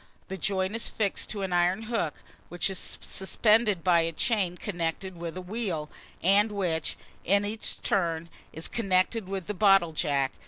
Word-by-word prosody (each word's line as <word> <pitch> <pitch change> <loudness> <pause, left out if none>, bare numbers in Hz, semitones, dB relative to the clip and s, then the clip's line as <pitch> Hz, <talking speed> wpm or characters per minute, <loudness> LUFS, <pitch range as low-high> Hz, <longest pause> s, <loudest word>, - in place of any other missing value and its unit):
The 190 - -3
joint 190 +2 -1
is 230 - +2
fixed 205 -3 -1
to 205 -2 -3
an 190 -2 -2
iron 175 +5 +2
hook, 220 -9 -1 0.3
which 175 +2 0
is 190 - -3
suspended 210 -1 +3
by 175 -2 +4
a 165 0 -1
chain 185 0 0
connected 175 0 -3
with 170 0 -6
a - - -4
wheel, 180 -7 -3 0.3
and 200 +4 +4
which, 175 -6 -2 0.3
in 200 +3 +2
its 215 +2 +1
turn, 170 -4 -1 0.2
is 160 - -3
connected 195 -1 0
with 195 -3 -4
the 210 - -3
bottle 195 -4 +4
jack. 140 -3 0
190 Hz, 165 wpm, -28 LUFS, 170-205 Hz, 0.3 s, by